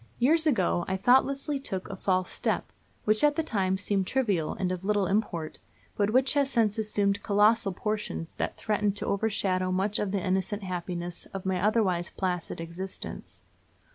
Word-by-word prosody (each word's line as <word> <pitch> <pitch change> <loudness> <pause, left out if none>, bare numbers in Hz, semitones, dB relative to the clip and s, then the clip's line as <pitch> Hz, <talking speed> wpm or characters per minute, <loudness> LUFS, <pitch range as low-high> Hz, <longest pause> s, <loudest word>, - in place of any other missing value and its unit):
Years 315 +6 +4
ago 185 - +2
I 190 - -1
thoughtlessly 275 +6 +3
took 190 -8 -3
a 195 - -6
false 185 -1 0
step, - - -1 0.3
which 215 +3 +2
at 295 0 +5
the 325 - 0
time 190 -9 0
seemed 195 -1 0
trivial 200 -12 0
and 185 -1 -1
of 185 0 -4
little 205 -1 +2
import, 180 -5 -1 0.4
but 205 0 +1
which 255 +4 +3
has 285 -2 +2
since 225 -4 +2
assumed 205 -2 +1
colossal 210 +1 +3
proportions 210 -4 -3
that - - -2
threaten 210 -2 0
to 205 - -3
overshadow 195 -3 0
much 195 +3 0
of 205 - -1
the 195 -1 -2
innocent 190 +2 -1
happiness 175 -1 -4
of 195 - -5
my 185 -1 0
otherwise 195 -5 +2
placid 180 -4 -3
existence. 170 +3 -7
200 Hz, 170 wpm, -28 LUFS, 185-215 Hz, 0.4 s, at